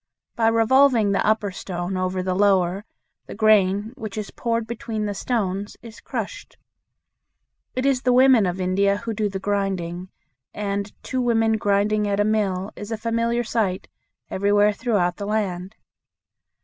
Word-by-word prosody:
By 225 Hz, -1 st, +2 dB
revolving 230 Hz, -1 st, +4 dB
the 195 Hz, -, +1 dB
upper 215 Hz, -2 st, +1 dB
stone 180 Hz, 0 st, -5 dB
over 185 Hz, 0 st, -1 dB
the 185 Hz, 0 st, -1 dB
lower 195 Hz, 0 st, +2 dB, 0.4 s
the -, -, -8 dB
grain 210 Hz, 0 st, +3 dB
which 215 Hz, -2 st, -7 dB
is 210 Hz, -2 st, -4 dB
poured 230 Hz, -1 st, -2 dB
between 225 Hz, -1 st, -4 dB
the 205 Hz, -, -2 dB
stones 200 Hz, -2 st, -2 dB
is 230 Hz, -2 st, -12 dB
crushed. -, -, -6 dB, 1.2 s
It 255 Hz, +1 st, -1 dB
is 270 Hz, -2 st, +2 dB
the 255 Hz, -, +2 dB
women 250 Hz, -5 st, +5 dB
of 180 Hz, +1 st, -3 dB
India 200 Hz, +2 st, +1 dB
who 230 Hz, +1 st, -4 dB
do 210 Hz, -1 st, -1 dB
the 195 Hz, -, -4 dB
grinding, 190 Hz, -3 st, -2 dB, 0.5 s
and 200 Hz, 0 st, -3 dB
"two 260 Hz, -, -2 dB
women 225 Hz, -2 st, +2 dB
grinding 205 Hz, +1 st, +1 dB
at 200 Hz, 0 st, 0 dB
a -, -, +4 dB
mill" 205 Hz, -3 st, 0 dB
is 205 Hz, +2 st, -8 dB
a 225 Hz, -, -2 dB
familiar 230 Hz, +1 st, 0 dB
sight 220 Hz, -5 st, -1 dB, 0.4 s
everywhere 205 Hz, +1 st, +3 dB
throughout 205 Hz, -6 st, 0 dB
the 200 Hz, -, -5 dB
land. 195 Hz, -2 st, -2 dB
205 Hz, 155 wpm, -23 LUFS, 195-225 Hz, 1.2 s, women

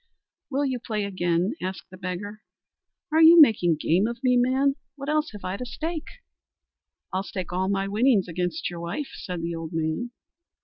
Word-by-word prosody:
"Will 285 Hz, +1 st, 0 dB
you 260 Hz, -2 st, -1 dB
play 215 Hz, -3 st, -3 dB
again?" 180 Hz, +1 st, 0 dB
asked 185 Hz, 0 st, -5 dB
the -, -, -10 dB
beggar. 195 Hz, +3 st, -5 dB, 0.7 s
"Are 320 Hz, +1 st, +4 dB
you 330 Hz, +1 st, +9 dB
making 210 Hz, -, +6 dB
game 175 Hz, +7 st, +2 dB
of 235 Hz, 0 st, -4 dB
me, 250 Hz, -1 st, +4 dB
man; 260 Hz, +3 st, +3 dB, 0.2 s
what 280 Hz, 0 st, -6 dB
else 305 Hz, 0 st, +1 dB
have 205 Hz, -2 st, -10 dB
I 185 Hz, +2 st, -2 dB
to 250 Hz, -, -5 dB
stake?" 320 Hz, +5 st, -4 dB, 1.1 s
"I'll 190 Hz, -, 0 dB
stake 185 Hz, -2 st, -6 dB
all 185 Hz, +1 st, 0 dB
my 195 Hz, 0 st, 0 dB
winnings 215 Hz, -1 st, +3 dB
against 180 Hz, +1 st, -2 dB
your 175 Hz, -1 st, -6 dB
wife," 175 Hz, -, -4 dB
said 180 Hz, -3 st, -6 dB
the 170 Hz, 0 st, -2 dB
old 165 Hz, 0 st, -6 dB
man. 160 Hz, +9 st, -1 dB
200 Hz, 180 wpm, -25 LUFS, 180-260 Hz, 1.1 s, you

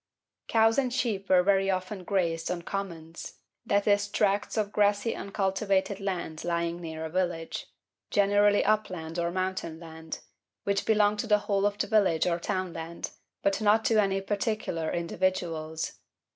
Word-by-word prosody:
Cows 225 Hz, +2 st, +4 dB
and 255 Hz, -2 st, 0 dB
sheep 215 Hz, -6 st, -1 dB
were 180 Hz, -1 st, +6 dB
very 195 Hz, 0 st, +3 dB
often 185 Hz, +1 st, -2 dB
grazed 170 Hz, -4 st, 0 dB
on 175 Hz, -1 st, -3 dB
'Commons,' 170 Hz, -4 st, -6 dB, 0.3 s
i.e., 205 Hz, 0 st, +4 dB
tracts 205 Hz, +1 st, +1 dB
of 210 Hz, -1 st, 0 dB
grassy 205 Hz, +2 st, +2 dB
uncultivated 195 Hz, 0 st, 0 dB
land 180 Hz, -5 st, -3 dB
lying 170 Hz, 0 st, -1 dB
near 160 Hz, -1 st, -5 dB
a -, -, -4 dB
village 175 Hz, -2 st, -2 dB, 0.4 s
generally 205 Hz, 0 st, +4 dB
upland 185 Hz, -6 st, 0 dB
or 170 Hz, 0 st, +1 dB
mountain 185 Hz, -3 st, -3 dB
land 160 Hz, -1 st, -8 dB, 0.4 s
which 200 Hz, 0 st, 0 dB
belonged 210 Hz, -1 st, +3 dB
to 225 Hz, -, -2 dB
the 210 Hz, -1 st, +5 dB
whole 200 Hz, 0 st, +2 dB
of 205 Hz, 0 st, -3 dB
the -, -, 0 dB
village 195 Hz, -7 st, +3 dB
or 175 Hz, -1 st, +1 dB
townland, 170 Hz, -2 st, -4 dB, 0.3 s
but 200 Hz, +1 st, +1 dB
not 215 Hz, +1 st, +4 dB
to 220 Hz, -2 st, +4 dB
any 195 Hz, -1 st, 0 dB
particular 200 Hz, -5 st, -2 dB
individuals. 170 Hz, -2 st, -2 dB
190 Hz, 145 wpm, -28 LUFS, 170-205 Hz, 0.4 s, were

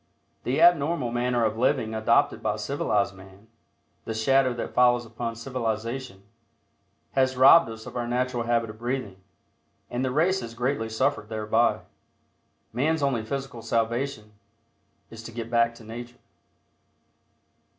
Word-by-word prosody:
The 130 Hz, +4 st, 0 dB
abnormal 165 Hz, -6 st, +4 dB
manner 120 Hz, -1 st, +1 dB
of 110 Hz, +1 st, -1 dB
living 110 Hz, -3 st, +1 dB
adopted 110 Hz, 0 st, +2 dB
by -, -, 0 dB
civilized 100 Hz, -1 st, -1 dB
man 95 Hz, +3 st, -16 dB, 0.6 s
the 110 Hz, -, -4 dB
shadow 130 Hz, +3 st, +3 dB
that 120 Hz, -, -5 dB
follows 120 Hz, -1 st, +4 dB
upon 115 Hz, 0 st, -5 dB
civilization 115 Hz, -2 st, -4 dB, 0.9 s
has 130 Hz, -1 st, +1 dB
robbed 135 Hz, +3 st, +7 dB
us 110 Hz, 0 st, -9 dB
of -, -, -10 dB
our 120 Hz, -1 st, -2 dB
natural 125 Hz, -1 st, -1 dB
habit 115 Hz, -2 st, 0 dB
of 110 Hz, -, -16 dB
breathing, 120 Hz, -6 st, -4 dB, 0.7 s
and 120 Hz, +1 st, -2 dB
the 130 Hz, -, 0 dB
race 170 Hz, +8 st, +2 dB
has 115 Hz, 0 st, -8 dB
greatly 120 Hz, -1 st, -1 dB
suffered 110 Hz, -2 st, -1 dB
thereby. 110 Hz, +1 st, +1 dB, 0.9 s
Man's 150 Hz, +5 st, 0 dB
only 130 Hz, -5 st, +1 dB
physical 135 Hz, 0 st, -5 dB
salvation 115 Hz, 0 st, -2 dB, 0.8 s
is 115 Hz, -1 st, -9 dB
to 115 Hz, -, -9 dB
"get 115 Hz, 0 st, -6 dB
back 115 Hz, 0 st, +2 dB
to 115 Hz, -, -14 dB
Nature." 120 Hz, +2 st, -9 dB
120 Hz, 140 wpm, -26 LUFS, 110-130 Hz, 0.9 s, robbed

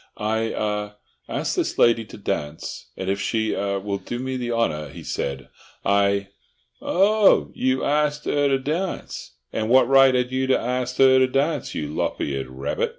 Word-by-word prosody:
"I—ah—asked 105 Hz, -1 st, -3 dB
this -, -, -1 dB
lady 115 Hz, -1 st, +4 dB
to 105 Hz, -, -12 dB
dance, 80 Hz, -7 st, -4 dB
and 95 Hz, -, -5 dB
if 100 Hz, +1 st, -1 dB
she—er—will 100 Hz, -3 st, -1 dB
do 120 Hz, -, -5 dB
me 130 Hz, +1 st, -3 dB
the 120 Hz, -2 st, -3 dB
honour," 75 Hz, -11 st, -1 dB
he -, -, -10 dB
said, 70 Hz, 0 st, -4 dB, 0.4 s
"I—" 100 Hz, 0 st, +2 dB, 0.5 s
"Oh! 205 Hz, +2 st, +3 dB
you 130 Hz, 0 st, 0 dB
arst 150 Hz, 0 st, 0 dB
'er 145 Hz, -1 st, +2 dB
to 135 Hz, -1 st, +2 dB
darnce? 155 Hz, -, -4 dB, 0.2 s
And 110 Hz, 0 st, -2 dB
what 130 Hz, 0 st, +5 dB
right 135 Hz, -1 st, +6 dB
'ad 125 Hz, 0 st, 0 dB
you 130 Hz, 0 st, 0 dB
to 130 Hz, -, +3 dB
arst 125 Hz, +1 st, -3 dB
'er 130 Hz, -1 st, +7 dB
to 130 Hz, -, +4 dB
darnce, 140 Hz, +2 st, -1 dB
you 75 Hz, -2 st, -3 dB
lop -, -, -2 dB
eared 70 Hz, -2 st, -2 dB
rabbit?" 65 Hz, +2 st, -2 dB
115 Hz, 160 wpm, -23 LUFS, 100-130 Hz, 0.5 s, er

